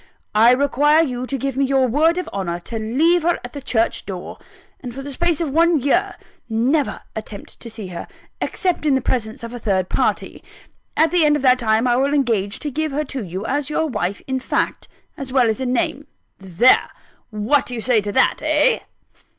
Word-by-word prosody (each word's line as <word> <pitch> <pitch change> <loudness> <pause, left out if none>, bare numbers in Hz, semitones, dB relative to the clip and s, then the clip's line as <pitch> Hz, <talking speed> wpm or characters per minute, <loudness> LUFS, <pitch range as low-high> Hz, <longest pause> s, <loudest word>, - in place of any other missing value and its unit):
I 220 +3 +6
require 285 +4 +4
you 255 -4 -3
to 275 - -2
give 270 0 -3
me 275 - +1
your 270 -1 +2
word 310 +8 +2
of 365 - -3
honour 175 -3 -3
to 225 +5 -5
leave 305 +11 +2
her 340 +2 +1
at 245 - -10
the 285 - -7
church 230 -4 0
door; 185 -3 -7 0.4
and 245 -2 -8
for 270 - -6
the 285 - -6
space 345 +1 0
of 325 -5 -2
one 335 +2 +4
year 275 +2 +1 0.3
never 255 +7 +1
to - - -13
attempt 215 -2 -8
to 235 - -8
see 215 -4 -8
her, 175 - -7 0.3
except 360 -5 -1
in 280 - +4
the 265 - +1
presence 240 -1 -2
of 230 +1 -7
a 245 - -6
third 190 -4 0
party. - - -1 0.5
At 320 0 +4
the 355 -2 +3
end 295 -1 +4
of 295 - -3
that 255 -1 +5
time, 225 0 +2
I 240 0 +3
will 280 +3 +1
engage 220 -7 0
to 295 - -3
give 310 +3 -2
her 295 +2 -1
to 265 -4 -5
you, 185 +3 -6
as 285 +3 -1
your 320 +1 0
wife 200 - -3
in 260 0 -2
fact, - - -2 0.3
as 270 -2 -6
well 255 -2 +3
as 220 - -5
in 255 -1 -1
name. 270 +3 -1 0.3
There! 190 +6 +3 0.4
what 225 +6 +1
do 250 - -4
you 225 - -4
say 235 -2 +2
to 205 0 -4
that 260 - +3
eh?" 310 +10 +3
260 Hz, 215 wpm, -20 LUFS, 225-295 Hz, 0.5 s, I